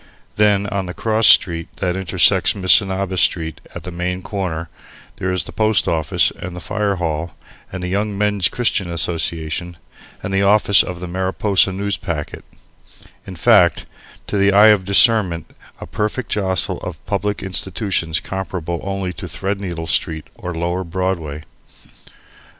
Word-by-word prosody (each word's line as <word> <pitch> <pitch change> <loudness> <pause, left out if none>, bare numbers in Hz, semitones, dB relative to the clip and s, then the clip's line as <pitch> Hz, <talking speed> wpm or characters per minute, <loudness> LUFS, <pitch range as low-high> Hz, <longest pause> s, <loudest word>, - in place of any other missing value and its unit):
Then 105 -1 +3
on 100 -3 -3
the 90 - -7
"cross" 110 0 +2
street 85 -3 +5
that 90 -2 -2
intersects 95 -3 +3
Missinaba 95 0 +2
Street 80 -2 0
at - - -7
the 90 - -7
main 90 +1 -3
corner 90 -5 -4 0.5
there 95 - -2
is 90 -1 0
the - - -10
Post 110 -1 +1
Office 80 -3 +2
and 90 0 -7
the - - -6
Fire 100 +5 -1
Hall 80 -2 -3 0.4
and 90 -1 -6
the - - -2
Young 100 +2 -2
Men's 105 -3 +2
Christian 110 -6 -1
Association 85 0 -2 0.5
and 95 - -4
the 95 - +2
office 100 0 +5
of 90 -1 -6
the 90 - -5
Mariposa 95 +2 +1
Newspacket, 95 -5 -4 0.9
in 95 - -7
fact, 80 - +4 0.4
to 100 - -2
the 100 +1 +4
eye 105 +2 +7
of 100 -3 +3
discernment 100 -5 +3 0.3
a - - -7
perfect 105 +4 -3
jostle 95 -5 0
of 90 -1 -8
public 105 0 -2
institutions 95 -3 -1
comparable 90 -3 -4
only 95 -1 -3
to - - -8
Threadneedle 95 -4 -4
Street 80 -1 -1
or 90 - -7
Lower 85 +3 -2
Broadway. 85 -4 -3
95 Hz, 150 wpm, -19 LUFS, 85-100 Hz, 0.9 s, eye